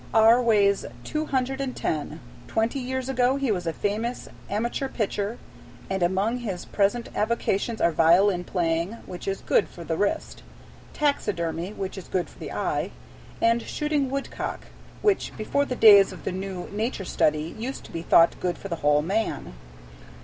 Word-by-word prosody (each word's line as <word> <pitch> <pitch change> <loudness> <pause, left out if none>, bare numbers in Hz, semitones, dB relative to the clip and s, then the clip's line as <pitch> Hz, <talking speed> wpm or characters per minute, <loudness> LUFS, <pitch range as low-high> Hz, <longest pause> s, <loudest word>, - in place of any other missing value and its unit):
R. 225 +2 +7
weighs 205 -4 +3 0.2
two 305 0 -2
hundred 265 0 -1
and 265 -2 -3
ten. 155 0 -3 0.3
Twenty 225 +5 0
years 260 0 -3
ago 255 0 +2
he 275 -4 0
was 180 -4 -2
a - - +1
famous 215 +7 -2 0.2
amateur 235 +6 -1
pitcher, 210 -2 -2 0.5
and 190 -1 -1
among 195 +7 +1
his 200 -7 -4
present 205 +4 0
avocations 220 0 0
are 170 - +3
violin 175 +4 +4
playing, 170 +2 -1
which 180 +1 -8
is 195 0 -2
good - - +2
for 170 - -10
the 165 -1 -2
wrist, 200 +4 -1 0.5
taxidermy, 180 - -1
which 195 -1 -5
is 185 - -11
good 180 -4 -2
for - - -19
the - - -6
eye, - - -1 0.5
and 230 +1 +4
shooting 300 -1 -1
woodcock, 275 +1 -4 0.4
which 410 -2 +2
before 280 +6 0
the 255 - -3
days 205 -4 +8
of - - -10
the - - -2
new 190 -1 -5
Nature 210 -1 -2
Study 155 0 +1
used 250 +5 -5
to - - -12
be 165 - -4
thought 165 0 +5
good 175 -2 -1
for 195 - -8
the 170 - -2
whole 150 0 +3
man. 205 - -2
205 Hz, 170 wpm, -25 LUFS, 180-245 Hz, 0.5 s, days